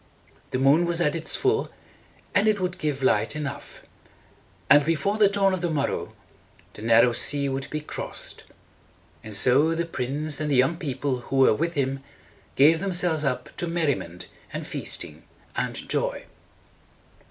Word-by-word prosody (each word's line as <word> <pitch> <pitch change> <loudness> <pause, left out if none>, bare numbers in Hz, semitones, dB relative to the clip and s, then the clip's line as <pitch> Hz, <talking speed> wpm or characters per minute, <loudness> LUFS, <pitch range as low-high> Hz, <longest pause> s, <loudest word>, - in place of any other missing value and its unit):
The - - -2
moon 140 +6 +4
was 170 0 +1
at 160 -2 +1
its 165 -1 +1
full, 410 +3 +1 0.6
and 200 +2 +3
it 215 -1 +2
would 180 -1 -3
give 145 -3 -2
light 110 +1 +2
enough; 140 -2 -6 0.8
and 145 0 +6
before 165 +7 0
the 205 -2 +6
dawn 200 -1 +2
of 185 - -2
the 175 - -1
morrow, 145 -3 -2 0.6
the - - -11
narrow 115 +2 +5
sea 140 +3 0
would 135 0 -3
be 155 - -4
crossed. 150 - -7 0.8
And 110 - -9
so 140 +9 +4
the 170 +1 -1
prince, 145 0 -2
and 155 -1 -2
the 140 - +2
young 135 +6 +3
people 135 -4 -2
who 125 - -6
were 135 -3 +5
with 170 +9 -2
him, 135 -1 -1 0.6
gave 155 +4 +5
themselves 175 -4 0
up 125 -3 -3
to 175 - -3
mer 170 -1 -1
ri 145 - +3
ment 85 -6 -8 0.2
and - - -5
feasting - - -4 0.3
and - - -3
joy. - - -2
150 Hz, 165 wpm, -25 LUFS, 135-170 Hz, 0.8 s, and